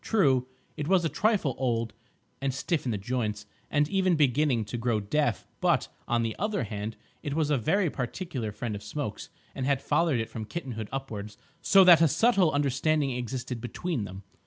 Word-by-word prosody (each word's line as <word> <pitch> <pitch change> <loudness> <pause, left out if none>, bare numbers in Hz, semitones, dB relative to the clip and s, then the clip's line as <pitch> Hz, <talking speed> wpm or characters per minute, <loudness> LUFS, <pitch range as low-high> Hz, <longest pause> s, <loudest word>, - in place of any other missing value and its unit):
True, 135 - +3 0.3
it 150 - -3
was 185 -1 +3
a - - +2
trifle 205 - +1
old, 115 -3 0 0.5
and 135 0 0
stiff 155 +2 -1
in 125 - 0
the 105 - -1
joints, 105 -1 -2 0.2
and 145 0 +2
even 190 0 +2
beginning 140 -5 +2
to 105 - -6
grow 115 -2 +1
deaf, 145 +9 0
but, - - +2 0.2
on 120 -1 +1
the 115 -1 -2
other 205 -3 0
hand, 105 0 -4 0.3
it 145 -2 -3
was 155 -2 +1
a 145 - +3
very 195 - +2
particular 130 - -4
friend 110 +2 -4
of 100 - -6
Smoke's, 145 -5 -5 0.2
and 130 - -3
had 140 -2 +2
fathered 150 -2 +1
it 115 - -2
from 110 -1 -5
kittenhood 115 -7 -5
upwards 105 -6 -5 0.2
so 195 -1 +6
that 175 -3 +8
a 165 - +7
subtle 185 - +3
understanding 145 +1 +1
existed 125 -1 -4
between 125 - -3
them. 95 +1 -9
135 Hz, 185 wpm, -28 LUFS, 115-160 Hz, 0.5 s, that